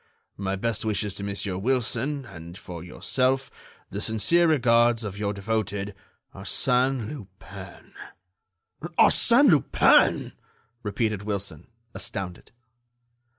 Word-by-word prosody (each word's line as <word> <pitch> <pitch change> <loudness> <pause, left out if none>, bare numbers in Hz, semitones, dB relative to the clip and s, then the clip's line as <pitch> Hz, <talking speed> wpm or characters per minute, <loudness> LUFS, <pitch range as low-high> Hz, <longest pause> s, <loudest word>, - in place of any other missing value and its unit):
"My 95 0 -2
best 110 +1 -2
wishes 105 -2 -1
to 100 - -8
Monsieur 100 -2 -3
Wilson, 130 +4 -1
and, 85 -4 -10
for 85 -5 -9
yourself, 130 +8 -1 0.4
the 100 - -4
sincere 110 - +3
regards 120 -5 +3
of 100 -2 -5
your 100 -1 -1
devoted 105 -1 -2 0.4
ARSÈNE 125 -2 0
LUPIN." 100 -9 -11 1.0
"Arsène - - +6
Lupin!" - - +4 0.5
repeated 105 -1 -1
Wilson, 100 -6 -5 0.3
astounded. 90 -2 -5
105 Hz, 100 wpm, -25 LUFS, 100-120 Hz, 1.0 s, Arsène